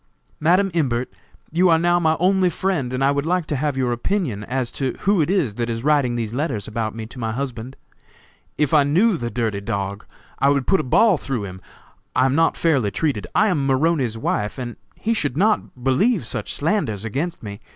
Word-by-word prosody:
"Madam 185 Hz, +5 st, +3 dB
Imbert, 130 Hz, -7 st, -1 dB, 0.4 s
you 180 Hz, +3 st, +3 dB
are 165 Hz, -, +5 dB
now 175 Hz, +1 st, +2 dB
my 160 Hz, -2 st, +2 dB
only 185 Hz, +1 st, +3 dB
friend, 170 Hz, -7 st, -1 dB
and 130 Hz, +1 st, -1 dB
I 140 Hz, -, +4 dB
would 140 Hz, 0 st, 0 dB
like 180 Hz, -1 st, +1 dB
to 150 Hz, -, -2 dB
have 140 Hz, 0 st, -1 dB
your 125 Hz, -2 st, +1 dB
opinion 120 Hz, -, -1 dB
as 125 Hz, 0 st, -2 dB
to 130 Hz, -3 st, -2 dB
who 200 Hz, -3 st, +3 dB
it 155 Hz, -, 0 dB
is 175 Hz, -, +1 dB
that 120 Hz, -, -1 dB
is 115 Hz, 0 st, -3 dB
writing 145 Hz, -5 st, +2 dB
these 115 Hz, -2 st, -3 dB
letters 125 Hz, -, -2 dB
about 110 Hz, -1 st, -3 dB
me 110 Hz, -1 st, -5 dB
to 120 Hz, +3 st, -11 dB
my 110 Hz, -2 st, -2 dB
husband. 125 Hz, -1 st, -5 dB, 0.8 s
If 150 Hz, -1 st, +1 dB
I 150 Hz, -, +7 dB
knew 180 Hz, +10 st, +3 dB
the 120 Hz, -7 st, -3 dB
dirty 110 Hz, -4 st, -2 dB
dog, 100 Hz, -1 st, -4 dB, 0.3 s
I 140 Hz, -, +4 dB
would 140 Hz, -2 st, +1 dB
put 195 Hz, -, +3 dB
a -, -, -1 dB
ball 190 Hz, -, +4 dB
through 125 Hz, -7 st, -3 dB
him. 95 Hz, -1 st, -9 dB, 0.5 s
I 130 Hz, -, +4 dB
am 135 Hz, -, +2 dB
not 165 Hz, +3 st, +2 dB
fairly 140 Hz, -11 st, +2 dB
treated. 110 Hz, -, -2 dB
I 210 Hz, +3 st, +4 dB
am 155 Hz, -7 st, 0 dB
Maroney's 135 Hz, -4 st, +1 dB
wife, 105 Hz, 0 st, -2 dB
and 120 Hz, -2 st, -5 dB, 0.2 s
he 230 Hz, -, -1 dB
should 145 Hz, -, -1 dB
not 200 Hz, -, 0 dB
believe 135 Hz, -, +2 dB
such -, -, -4 dB
slanders 140 Hz, -, -1 dB
against 145 Hz, -, -3 dB
me. 100 Hz, -1 st, -7 dB
135 Hz, 210 wpm, -21 LUFS, 115-170 Hz, 0.8 s, I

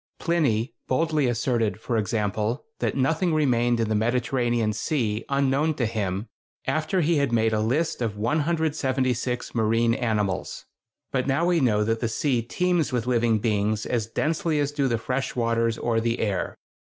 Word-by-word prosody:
Pliny 140 Hz, -9 st, 0 dB
boldly 155 Hz, 0 st, +1 dB
asserted, 115 Hz, -2 st, 0 dB
for 120 Hz, +1 st, -3 dB
example, 105 Hz, +1 st, -1 dB
that -, -, -1 dB
nothing 160 Hz, +5 st, +1 dB
remained 120 Hz, -5 st, +2 dB
in 115 Hz, -, +1 dB
the 110 Hz, -, 0 dB
Mediterranean 120 Hz, 0 st, +1 dB
Sea 110 Hz, -2 st, -1 dB
unknown 140 Hz, +3 st, +1 dB
to 125 Hz, -, 0 dB
him 105 Hz, -2 st, -2 dB, 0.4 s
after 155 Hz, +4 st, 0 dB
he 165 Hz, 0 st, +2 dB
had 140 Hz, -4 st, +1 dB
made 110 Hz, -1 st, +2 dB
a 110 Hz, -, +1 dB
list 130 Hz, +8 st, 0 dB
of 110 Hz, -3 st, -2 dB
176 130 Hz, -3 st, 0 dB
marine 115 Hz, +1 st, +2 dB
animals! 105 Hz, -6 st, -2 dB, 0.5 s
But 130 Hz, -1 st, 0 dB
now 140 Hz, +5 st, +2 dB
we 175 Hz, -1 st, +3 dB
know 110 Hz, -6 st, +2 dB
that 115 Hz, +1 st, 0 dB
the 115 Hz, -, -1 dB
sea 125 Hz, +1 st, 0 dB
teems 170 Hz, +5 st, 0 dB
with 120 Hz, -2 st, -1 dB
living 120 Hz, -2 st, +2 dB
beings 105 Hz, 0 st, 0 dB
as 115 Hz, -3 st, -1 dB
densely 155 Hz, +5 st, 0 dB
as 145 Hz, 0 st, 0 dB
do 145 Hz, -2 st, 0 dB
the 120 Hz, -2 st, +1 dB
fresh 130 Hz, +4 st, -3 dB
waters 115 Hz, -1 st, +1 dB
or 115 Hz, -1 st, 0 dB
the 115 Hz, +1 st, 0 dB
air. 100 Hz, -5 st, -2 dB
120 Hz, 165 wpm, -25 LUFS, 110-140 Hz, 0.5 s, we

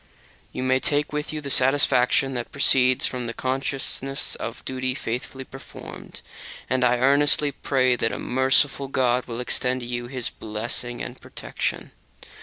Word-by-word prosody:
You 130 Hz, -, -3 dB
will 130 Hz, 0 st, +3 dB
take 145 Hz, +2 st, 0 dB
with 150 Hz, 0 st, -3 dB
you 155 Hz, -1 st, -5 dB
the 140 Hz, -1 st, -3 dB
satisfaction 135 Hz, 0 st, +4 dB
that 120 Hz, -2 st, -5 dB
proceeds 130 Hz, -1 st, +4 dB
from 125 Hz, -1 st, -3 dB
the 115 Hz, 0 st, -5 dB
consciousness 135 Hz, +1 st, -2 dB
of 115 Hz, +1 st, -6 dB
duty 130 Hz, -1 st, -2 dB
faithfully 130 Hz, +1 st, -5 dB
performed; 135 Hz, +1 st, -11 dB, 0.5 s
and 130 Hz, 0 st, 0 dB
I 125 Hz, 0 st, +3 dB
earnestly 140 Hz, +3 st, +4 dB
pray 130 Hz, -2 st, +1 dB
that 115 Hz, -1 st, -1 dB
a -, -, -4 dB
merciful 135 Hz, +2 st, +2 dB
God 125 Hz, -2 st, +1 dB
will 115 Hz, -1 st, -5 dB
extend 125 Hz, +1 st, -1 dB
to -, -, -6 dB
you 120 Hz, 0 st, -4 dB
His 125 Hz, -2 st, -4 dB
blessing 120 Hz, +3 st, -3 dB
and -, -, -8 dB
protection. -, -, -5 dB
130 Hz, 155 wpm, -24 LUFS, 125-135 Hz, 0.5 s, satisfaction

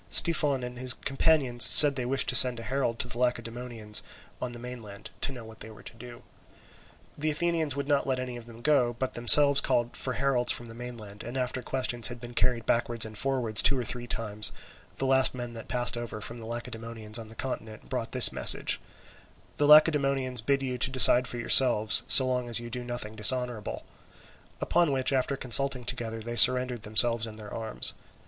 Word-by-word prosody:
Styphon 145 Hz, -6 st, +2 dB
and 125 Hz, 0 st, -9 dB
his 125 Hz, -2 st, -3 dB
companions 135 Hz, -3 st, 0 dB
said 145 Hz, +4 st, +7 dB
they 125 Hz, -1 st, -5 dB
wished 135 Hz, +1 st, 0 dB
to -, -, 0 dB
send 125 Hz, -2 st, +3 dB
a -, -, -10 dB
herald 130 Hz, -2 st, -4 dB
to 125 Hz, -, 0 dB
the 120 Hz, -1 st, -8 dB
Lacedaemonians 115 Hz, -3 st, -2 dB, 0.4 s
on 125 Hz, -, -6 dB
the 120 Hz, -, -12 dB
mainland, 120 Hz, -4 st, -12 dB
to -, -, -2 dB
know 120 Hz, -4 st, -12 dB
what 110 Hz, 0 st, -16 dB
they 110 Hz, -, -11 dB
were 110 Hz, -, -17 dB
to -, -, -13 dB
do. 120 Hz, +1 st, -15 dB, 0.9 s
The 155 Hz, +2 st, -4 dB
Athenians 160 Hz, -2 st, -2 dB
would 140 Hz, 0 st, -6 dB
not 145 Hz, -1 st, -2 dB
let 130 Hz, -1 st, -3 dB
any 125 Hz, -1 st, -8 dB
of 120 Hz, -1 st, -13 dB
them 115 Hz, 0 st, -16 dB
go, 125 Hz, -5 st, 0 dB
but 130 Hz, +1 st, -5 dB
themselves 140 Hz, +4 st, +5 dB
called 120 Hz, 0 st, -3 dB
for 130 Hz, -, -5 dB
heralds 125 Hz, -2 st, +1 dB
from 120 Hz, -, -2 dB
the 115 Hz, -, -14 dB
mainland, 115 Hz, -4 st, -12 dB
and 120 Hz, +3 st, -9 dB
after 125 Hz, 0 st, -5 dB
questions 125 Hz, -3 st, -2 dB
had 120 Hz, 0 st, -10 dB
been 120 Hz, 0 st, -12 dB
carried 120 Hz, -1 st, -2 dB
backwards 115 Hz, -1 st, -1 dB
and 110 Hz, 0 st, -12 dB
forwards 120 Hz, -3 st, 0 dB
two 135 Hz, -, +2 dB
or 125 Hz, -, -4 dB
three 120 Hz, +1 st, -8 dB
times, 105 Hz, -2 st, 0 dB, 0.4 s
the 135 Hz, -, -5 dB
last 130 Hz, 0 st, +1 dB
man 120 Hz, -1 st, -9 dB
that 115 Hz, -1 st, -12 dB
passed 120 Hz, -1 st, +1 dB
over 120 Hz, -2 st, -8 dB
from 115 Hz, +3 st, -7 dB
the 110 Hz, -, -12 dB
Lacedaemonians 115 Hz, -2 st, -6 dB
on 115 Hz, -, -11 dB
the 110 Hz, -, -16 dB
continent 110 Hz, -, -9 dB
brought -, -, -6 dB
this -, -, +6 dB
message: -, -, +3 dB, 0.8 s
"The 145 Hz, -, -1 dB
Lacedaemonians 140 Hz, -5 st, +2 dB
bid 135 Hz, +4 st, -2 dB
you 125 Hz, -1 st, -6 dB
to 125 Hz, -, -2 dB
decide 125 Hz, -1 st, +6 dB
for 120 Hz, -, -8 dB
yourselves 120 Hz, -2 st, +5 dB
so 130 Hz, -, +7 dB
long 125 Hz, -1 st, -4 dB
as 115 Hz, -, +2 dB
you 120 Hz, 0 st, -11 dB
do 125 Hz, +1 st, -7 dB
nothing 120 Hz, -3 st, -8 dB
dishonourable"; 110 Hz, 0 st, 0 dB, 0.8 s
upon 170 Hz, -3 st, -1 dB
which 135 Hz, 0 st, -2 dB
after 135 Hz, +1 st, -3 dB
consulting 130 Hz, 0 st, +3 dB
together 115 Hz, -2 st, -6 dB
they 120 Hz, +2 st, -8 dB
surrendered 125 Hz, -2 st, +4 dB
themselves 115 Hz, +1 st, +2 dB
and 110 Hz, -1 st, -12 dB
their 105 Hz, -1 st, -13 dB
arms. 110 Hz, -1 st, -1 dB
120 Hz, 200 wpm, -25 LUFS, 115-130 Hz, 0.9 s, said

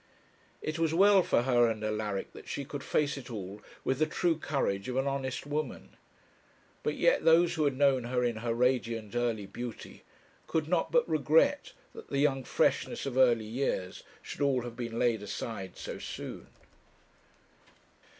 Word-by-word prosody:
It 155 Hz, +1 st, -3 dB
was 165 Hz, -1 st, +1 dB
well 200 Hz, +1 st, +6 dB
for 120 Hz, -, +2 dB
her 120 Hz, -2 st, +4 dB
and 110 Hz, -1 st, -4 dB
Alaric 105 Hz, -2 st, -2 dB
that -, -, -11 dB
she 140 Hz, -, -3 dB
could 145 Hz, 0 st, -6 dB
face 150 Hz, -1 st, 0 dB
it 130 Hz, -2 st, -9 dB
all 105 Hz, -2 st, -7 dB, 0.2 s
with 130 Hz, +1 st, 0 dB
the 155 Hz, -, +3 dB
true 170 Hz, +1 st, +1 dB
courage 130 Hz, -9 st, -2 dB
of 125 Hz, -, -3 dB
an 135 Hz, -, +1 dB
honest 135 Hz, -2 st, -2 dB
woman. 150 Hz, +1 st, -4 dB, 0.9 s
But -, -, -1 dB
yet -, -, +3 dB
those 165 Hz, +1 st, +5 dB
who 155 Hz, -3 st, +1 dB
had 140 Hz, -2 st, 0 dB
known 135 Hz, -3 st, +3 dB
her 125 Hz, +1 st, 0 dB
in 120 Hz, -2 st, 0 dB
her 115 Hz, +1 st, -2 dB
radiant 115 Hz, -4 st, 0 dB
early 115 Hz, -4 st, 0 dB
beauty 120 Hz, +3 st, -8 dB, 0.5 s
could 160 Hz, -2 st, -1 dB
not 175 Hz, 0 st, +1 dB
but 485 Hz, -1 st, +3 dB
regret -, -, +2 dB, 0.2 s
that 455 Hz, -, -11 dB
the -, -, -2 dB
young 140 Hz, -2 st, +2 dB
freshness -, -, 0 dB
of 135 Hz, -3 st, -3 dB
early 120 Hz, -4 st, +4 dB
years 110 Hz, -5 st, -2 dB, 0.2 s
should -, -, -7 dB
all 135 Hz, -3 st, +2 dB
have 120 Hz, -1 st, -7 dB
been 115 Hz, -2 st, -5 dB
laid 120 Hz, -3 st, +2 dB
aside 100 Hz, -2 st, -6 dB
so -, -, -6 dB
soon. -, -, -7 dB
130 Hz, 170 wpm, -30 LUFS, 115-150 Hz, 0.9 s, well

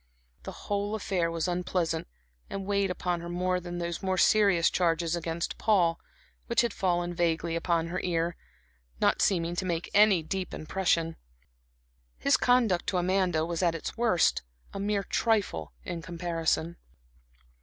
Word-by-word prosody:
The -, -, -7 dB
whole 205 Hz, +1 st, -1 dB
affair 185 Hz, -5 st, -1 dB
was 165 Hz, 0 st, -2 dB
unpleasant, 175 Hz, -2 st, -1 dB, 0.4 s
and 195 Hz, -1 st, -5 dB
weighed 200 Hz, -1 st, +1 dB
upon 180 Hz, -1 st, -2 dB
her 170 Hz, -, -7 dB
more 180 Hz, +1 st, 0 dB
than 175 Hz, 0 st, -6 dB
those 170 Hz, -1 st, -3 dB
more 190 Hz, -1 st, -1 dB
serious 195 Hz, -4 st, +4 dB
charges 170 Hz, -1 st, +1 dB
against 170 Hz, 0 st, -3 dB
Paul, 175 Hz, -6 st, +3 dB, 0.5 s
which 235 Hz, -, +3 dB
had 235 Hz, -, -1 dB
fallen 175 Hz, -2 st, 0 dB
vaguely 170 Hz, -1 st, 0 dB
upon 165 Hz, -1 st, 0 dB
her 180 Hz, +2 st, -2 dB
ear, 170 Hz, -1 st, 0 dB, 0.6 s
not -, -, +2 dB
seeming 175 Hz, -3 st, +1 dB
to -, -, 0 dB
make 170 Hz, -2 st, -3 dB
any 205 Hz, -5 st, +5 dB
deep 185 Hz, +3 st, -4 dB
impression. 165 Hz, -1 st, 0 dB, 1.0 s
His 140 Hz, -, +3 dB
conduct 235 Hz, -8 st, +2 dB
to 195 Hz, -, 0 dB
Amanda 180 Hz, -3 st, +1 dB
was 170 Hz, 0 st, -3 dB
at 170 Hz, -2 st, +2 dB
its 165 Hz, -, -5 dB
worst 225 Hz, -8 st, +2 dB, 0.3 s
a -, -, -5 dB
mere 200 Hz, 0 st, 0 dB
trifle 195 Hz, -, 0 dB
in 170 Hz, -1 st, -5 dB
comparison. 170 Hz, -1 st, -2 dB
175 Hz, 150 wpm, -28 LUFS, 165-190 Hz, 1.0 s, any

